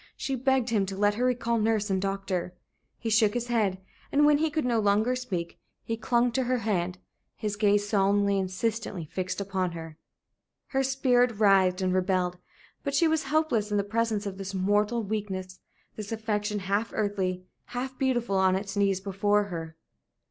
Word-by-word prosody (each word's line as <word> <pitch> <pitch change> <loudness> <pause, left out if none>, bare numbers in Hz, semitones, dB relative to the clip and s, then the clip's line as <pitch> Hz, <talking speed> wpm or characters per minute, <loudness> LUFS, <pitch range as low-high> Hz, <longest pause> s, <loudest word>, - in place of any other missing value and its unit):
She 270 - -3
begged 260 -1 +1
him 200 -4 +2
to 190 0 -5
let 205 +1 +3
her 240 +4 0
recall 235 -2 +1
nurse 215 -1 +1
and 190 -1 +1
doctor. 195 -2 -2 0.4
He 225 - -3
shook 215 0 +4
his 240 0 -2
head, 210 -6 +1 0.3
and 290 +1 +4
when 295 -1 +5
he 320 +1 +2
could 305 -2 -1
no 235 -2 +2
longer 215 +4 +2
speak, 185 -10 -4 0.2
he 225 - -2
clung 240 +2 +1
to 255 +2 0
her 255 +1 +1
hand, 185 -5 -1 0.4
his 210 -1 -3
gaze 205 -1 +2
solemnly, 200 -1 +2
insistently, 190 -1 -2
fixed 185 +5 -4
upon 190 -3 -2
her. 160 -1 -8 0.7
Her 270 - +1
spirit 250 -3 +2
writhed 195 -3 +4
and 185 -1 +1
rebelled. 180 -1 0 0.4
But 280 - -2
she 335 - +4
was 315 -1 +1
helpless 270 -8 +1
in 210 - 0
the 200 - +2
presence 220 0 -1
of 195 -1 -5
this 195 0 -5
mortal 205 +4 +1
weakness, 190 -3 -4 0.4
this 210 0 -7
affection, 210 -2 -2
half 200 +3 -1
earthly, 190 -4 -1 0.2
half 255 +2 -5
beautiful, 240 -6 +1
on 190 -1 +4
its 195 +1 -4
knees 195 -2 +2
before 205 +1 +1
her. 165 -2 -6
205 Hz, 175 wpm, -28 LUFS, 190-235 Hz, 0.7 s, when